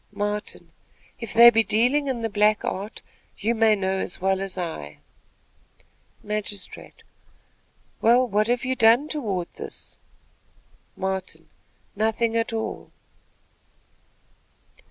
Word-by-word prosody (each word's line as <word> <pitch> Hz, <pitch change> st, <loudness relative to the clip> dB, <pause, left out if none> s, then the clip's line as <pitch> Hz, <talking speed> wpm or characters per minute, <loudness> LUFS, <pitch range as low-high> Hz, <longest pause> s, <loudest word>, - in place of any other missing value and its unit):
Martin. 205 Hz, +1 st, -4 dB, 0.5 s
"If 230 Hz, -3 st, -6 dB
they 235 Hz, +1 st, +9 dB
be 225 Hz, -1 st, +4 dB
dealing 250 Hz, +8 st, +2 dB
in 245 Hz, -4 st, -2 dB
the -, -, +1 dB
black 210 Hz, +1 st, +2 dB
art, 200 Hz, +3 st, -5 dB, 0.3 s
you 225 Hz, +3 st, 0 dB
may 225 Hz, -1 st, +4 dB
know 190 Hz, -1 st, -1 dB
as 180 Hz, -, -3 dB
well 190 Hz, +1 st, +1 dB
as 195 Hz, -1 st, -4 dB
I." 160 Hz, -, -5 dB, 1.3 s
Magistrate. 210 Hz, -2 st, -5 dB, 1.0 s
"Well, 245 Hz, +3 st, +4 dB
what 215 Hz, 0 st, +1 dB
have 245 Hz, +2 st, 0 dB
you 260 Hz, 0 st, 0 dB
done 235 Hz, +5 st, +4 dB
toward 200 Hz, -, -2 dB
this?" -, -, -8 dB, 1.0 s
Martin. 190 Hz, -1 st, -4 dB, 0.5 s
"Nothing 225 Hz, +2 st, 0 dB
at 230 Hz, 0 st, 0 dB
all." 225 Hz, -1 st, -4 dB
215 Hz, 115 wpm, -24 LUFS, 195-235 Hz, 1.3 s, they